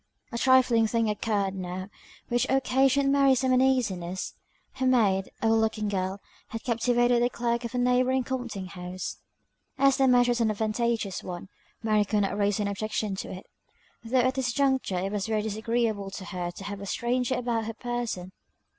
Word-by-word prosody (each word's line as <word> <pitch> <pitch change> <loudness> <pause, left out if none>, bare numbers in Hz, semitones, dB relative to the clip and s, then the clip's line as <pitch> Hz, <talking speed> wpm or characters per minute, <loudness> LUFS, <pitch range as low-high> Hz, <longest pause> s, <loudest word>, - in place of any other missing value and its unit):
A 235 - -3
trifling 250 -4 +4
thing 225 -1 +1
occurred 205 -2 -1
now 185 0 -5 0.4
which 240 0 +1
occasioned 270 +1 +3
Mary 275 -1 +5
some 260 0 +1
uneasiness. 220 -9 +1 0.4
Her 260 -1 -1
maid, 205 -7 +3
a - - +3
well 225 0 +4
looking 220 -1 0
girl, 190 0 -2 0.3
had 225 - -6
captivated 240 0 +2
the 245 - +3
clerk 235 0 -1
of 235 - -5
a - - 0
neighbouring 250 +1 +2
compting 240 -7 -4
house. 180 0 -6 0.6
As 275 0 +4
the 270 -1 +4
match 245 -1 +5
was 240 -1 +1
an 225 - +3
advantageous 220 -1 -1
one, 180 +1 -7 0.3
Mary 215 -1 +3
could 205 0 0
not 195 0 0
raise 205 0 +1
any 200 -1 0
objection 215 0 -2
to - - -5
it, 185 - -8 0.6
though 235 +3 0
at 255 +1 +3
this 260 -2 -1
juncture 265 -8 +1
it 190 +2 -2
was 205 0 -2
very 215 -1 0
disagreeable 220 -1 -1
to 190 0 -8
her 180 -3 -4
to 175 - -9
have 200 0 -6
a 200 - -6
stranger 245 +5 0
about 235 -2 -1
her 225 0 -5
person. 235 -7 -4
225 Hz, 180 wpm, -27 LUFS, 200-250 Hz, 0.6 s, Mary